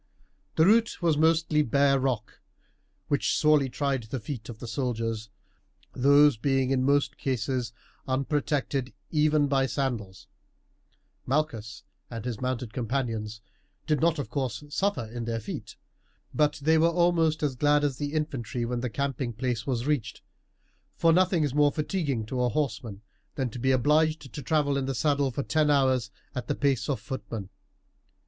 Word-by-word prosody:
The 160 Hz, -, +5 dB
route 225 Hz, +3 st, +3 dB
was 165 Hz, -3 st, +3 dB
mostly 160 Hz, 0 st, +3 dB
bare 140 Hz, +1 st, +3 dB
rock, 125 Hz, -5 st, -2 dB, 0.7 s
which 145 Hz, -, +1 dB
sorely 150 Hz, -3 st, +4 dB
tried 135 Hz, 0 st, -1 dB
the 115 Hz, +4 st, -5 dB
feet 115 Hz, -1 st, -7 dB
of 115 Hz, -, -7 dB
the 120 Hz, -, -8 dB
soldiers, 115 Hz, -3 st, -3 dB, 0.6 s
these 140 Hz, 0 st, +5 dB
being 135 Hz, +2 st, +1 dB
in 130 Hz, -1 st, +2 dB
most 140 Hz, +1 st, +1 dB
cases 125 Hz, -2 st, -1 dB, 0.4 s
unprotected 135 Hz, 0 st, -1 dB, 0.2 s
even 150 Hz, -1 st, +3 dB
by 135 Hz, -1 st, +2 dB
sandals. 120 Hz, -9 st, -3 dB, 1.0 s
Malchus 115 Hz, -8 st, -2 dB, 0.3 s
and 115 Hz, -1 st, -6 dB
his 120 Hz, -3 st, -4 dB
mounted 125 Hz, -3 st, -3 dB
companions 115 Hz, -3 st, -3 dB, 0.4 s
did 150 Hz, -3 st, +1 dB
not 165 Hz, 0 st, +3 dB
of 145 Hz, -, -5 dB
course 130 Hz, -3 st, -2 dB
suffer 195 Hz, -, 0 dB
in 115 Hz, +1 st, -6 dB
their 115 Hz, -1 st, -2 dB
feet. 110 Hz, -, -7 dB, 0.6 s
But 150 Hz, -1 st, +3 dB
they 160 Hz, +2 st, +4 dB
were 165 Hz, -, +5 dB
almost 170 Hz, -2 st, +2 dB
as 140 Hz, -3 st, 0 dB
glad 145 Hz, +2 st, +3 dB
as 140 Hz, -3 st, 0 dB
the 145 Hz, 0 st, -3 dB
infantry 135 Hz, -6 st, -2 dB
when 120 Hz, +1 st, -2 dB
the 125 Hz, +1 st, -2 dB
camping 130 Hz, -1 st, -2 dB
place 120 Hz, 0 st, -3 dB
was 125 Hz, -2 st, -1 dB
reached, 130 Hz, -6 st, -2 dB, 0.7 s
for 165 Hz, -1 st, +4 dB
nothing 180 Hz, -2 st, +3 dB
is 145 Hz, -3 st, -1 dB
more 145 Hz, 0 st, +4 dB
fatiguing 150 Hz, -, -2 dB
to 125 Hz, +3 st, -2 dB
a 125 Hz, -, +2 dB
horseman 115 Hz, -7 st, -3 dB, 0.3 s
than 130 Hz, -4 st, -2 dB
to 125 Hz, -, -7 dB
be 130 Hz, -, +1 dB
obliged 150 Hz, +2 st, +2 dB
to 145 Hz, -, -5 dB
travel 145 Hz, +1 st, +1 dB
in 135 Hz, -1 st, -2 dB
the 135 Hz, -, -2 dB
saddle 140 Hz, +1 st, +1 dB
for 140 Hz, +2 st, -3 dB
ten 155 Hz, 0 st, +1 dB
hours 130 Hz, -5 st, +2 dB, 0.2 s
at 125 Hz, -, -5 dB
the 145 Hz, -, 0 dB
pace 140 Hz, -1 st, 0 dB
of 135 Hz, -5 st, 0 dB
footmen. 110 Hz, -4 st, -6 dB
135 Hz, 160 wpm, -27 LUFS, 120-150 Hz, 1.0 s, The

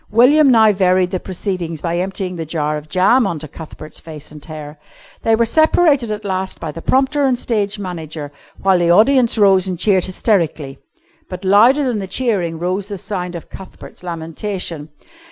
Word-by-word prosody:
William 270 Hz, +7 st, +5 dB
now 220 Hz, -3 st, +6 dB
varied 185 Hz, -1 st, +2 dB
the 185 Hz, -, -2 dB
proceedings 180 Hz, -4 st, -4 dB
by 170 Hz, +2 st, -2 dB
emptying 185 Hz, 0 st, -3 dB
the 165 Hz, -, -4 dB
jar 150 Hz, -1 st, -2 dB
of 150 Hz, 0 st, -8 dB
jam 200 Hz, +7 st, +3 dB
on 170 Hz, -, -3 dB
to 155 Hz, +1 st, -7 dB
Cuthbert's 155 Hz, 0 st, -10 dB
face 155 Hz, -3 st, -10 dB
and 150 Hz, -1 st, -12 dB
hair. 150 Hz, -1 st, -9 dB, 0.4 s
They 225 Hz, -, +3 dB
were 235 Hz, +1 st, +2 dB
separated 300 Hz, -1 st, +3 dB
at 210 Hz, 0 st, -5 dB
last 190 Hz, -1 st, -3 dB
by 160 Hz, -, -5 dB
the 165 Hz, -, -9 dB
prompter 270 Hz, -, +1 dB
and 260 Hz, -2 st, +2 dB
stage 210 Hz, -4 st, -1 dB
manager, 160 Hz, -6 st, -6 dB, 0.3 s
while 190 Hz, -2 st, +3 dB
the 170 Hz, -1 st, +1 dB
audience 235 Hz, +6 st, +4 dB
rose 195 Hz, -3 st, +4 dB
and 185 Hz, -2 st, -3 dB
cheered 190 Hz, 0 st, +2 dB
hysterically. 170 Hz, -, -1 dB, 0.5 s
But 185 Hz, +1 st, -7 dB
louder 230 Hz, +9 st, +5 dB
than 245 Hz, -5 st, -1 dB
the 195 Hz, -, -5 dB
cheering 190 Hz, -7 st, -1 dB
rose 185 Hz, +4 st, -2 dB
the 205 Hz, -2 st, -5 dB
sound 180 Hz, -3 st, -5 dB
of 170 Hz, -, -9 dB
Cuthbert's 190 Hz, -, -11 dB
lamentation. 165 Hz, -1 st, -5 dB
185 Hz, 180 wpm, -18 LUFS, 165-215 Hz, 0.5 s, now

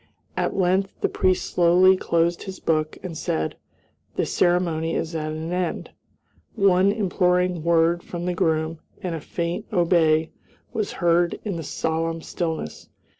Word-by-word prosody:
At -, -, -1 dB
length 190 Hz, +1 st, +2 dB
the -, -, +3 dB
priest 185 Hz, -1 st, +1 dB
slowly 180 Hz, +2 st, +5 dB
closed 170 Hz, -1 st, +1 dB
his 190 Hz, -1 st, -7 dB
book 155 Hz, -1 st, 0 dB
and 180 Hz, -3 st, -5 dB
said, 80 Hz, -, -2 dB, 0.6 s
"The -, -, +1 dB
ceremony 170 Hz, -2 st, +1 dB
is 165 Hz, +1 st, -2 dB
at 155 Hz, -1 st, -2 dB
an 160 Hz, +2 st, -4 dB
end." 180 Hz, -1 st, -2 dB, 0.6 s
One 195 Hz, -2 st, +4 dB
imploring 180 Hz, -4 st, +1 dB
word 170 Hz, +1 st, +3 dB
from 175 Hz, 0 st, -6 dB
the 180 Hz, -, 0 dB
groom, 160 Hz, -1 st, 0 dB, 0.2 s
and 180 Hz, -2 st, -2 dB
a 160 Hz, -, -4 dB
faint 170 Hz, +2 st, -3 dB
"obey" 165 Hz, -4 st, +3 dB, 0.4 s
was 215 Hz, -2 st, -2 dB
heard 170 Hz, 0 st, +2 dB
in 200 Hz, -4 st, -2 dB
the 165 Hz, -, -4 dB
solemn 160 Hz, +1 st, -2 dB
stillness. 160 Hz, -, -4 dB
170 Hz, 145 wpm, -24 LUFS, 160-180 Hz, 0.6 s, slowly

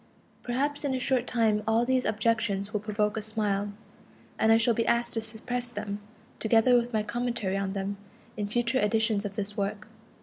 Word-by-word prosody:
Perhaps 280 Hz, +5 st, -1 dB
in 275 Hz, -2 st, 0 dB
a -, -, -1 dB
short 255 Hz, -1 st, +1 dB
time 220 Hz, -3 st, +2 dB
all 225 Hz, +2 st, +3 dB
these 260 Hz, 0 st, +1 dB
objections 215 Hz, -2 st, 0 dB
will 210 Hz, -, +1 dB
provoke 210 Hz, 0 st, -1 dB
a -, -, -1 dB
smile, 205 Hz, -2 st, -1 dB, 0.7 s
and 220 Hz, -, +4 dB
I 225 Hz, -, +7 dB
shall 230 Hz, +1 st, +3 dB
be 230 Hz, +1 st, 0 dB
asked 235 Hz, 0 st, +2 dB
to 225 Hz, -, -1 dB
suppress 240 Hz, +3 st, -3 dB
them, 205 Hz, -2 st, -4 dB, 0.4 s
together 225 Hz, +2 st, +4 dB
with 240 Hz, 0 st, +2 dB
my 215 Hz, -2 st, +1 dB
commentary 235 Hz, -3 st, -2 dB
on 195 Hz, -1 st, -1 dB
them, 200 Hz, 0 st, -3 dB, 0.4 s
in 205 Hz, -1 st, -2 dB
future 240 Hz, +4 st, +1 dB
editions 220 Hz, -1 st, +2 dB
of 200 Hz, -1 st, -5 dB
this 205 Hz, -1 st, -4 dB
work. 200 Hz, -1 st, -3 dB
220 Hz, 190 wpm, -28 LUFS, 205-240 Hz, 0.7 s, I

